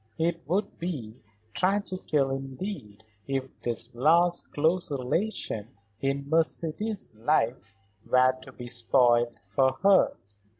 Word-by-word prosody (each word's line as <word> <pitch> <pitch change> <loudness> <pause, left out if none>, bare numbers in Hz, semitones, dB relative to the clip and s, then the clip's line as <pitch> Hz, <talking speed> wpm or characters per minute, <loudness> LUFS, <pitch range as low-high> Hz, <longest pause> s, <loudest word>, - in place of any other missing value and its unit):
It 165 +1 0
would 195 +5 -1
be 130 -11 -5 0.3
tragical 185 -7 0
indeed 135 - -6 0.2
if 135 -1 -1
this 115 0 -1
last 170 +7 +3
close 165 +5 +1
relation 135 - -2 0.3
in 140 0 -1
Mercedes's 165 - 0
life 115 -3 0 0.3
were 130 0 +5
to 130 - -11
be 125 -1 -9
spoiled 120 0 +3
for 130 +7 +2
her. 195 -1 +5
135 Hz, 110 wpm, -28 LUFS, 120-170 Hz, 0.3 s, were